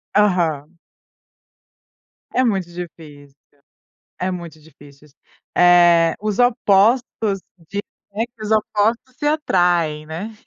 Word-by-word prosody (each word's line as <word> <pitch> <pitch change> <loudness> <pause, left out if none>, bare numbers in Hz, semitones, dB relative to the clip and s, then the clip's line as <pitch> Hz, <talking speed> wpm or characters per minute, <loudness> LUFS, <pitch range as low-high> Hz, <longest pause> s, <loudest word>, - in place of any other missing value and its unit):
Aham. 170 -6 +1 1.5
É 255 - +1
muito 190 -7 -1
difícil, 150 -5 -11 0.8
é 185 - -1
muito 170 -3 -8
difícil 145 -1 -18
isso, 140 - -28 0.4
eh, 175 -2 +5
os 210 0 -2
opostos 225 -3 +2 0.3
de 200 - -3 0.6
os 215 0 -4
opostos 220 +4 0
se 295 - -5
atraem, 175 - +1
né, 190 +8 -7
180 Hz, 95 wpm, -20 LUFS, 160-215 Hz, 1.5 s, eh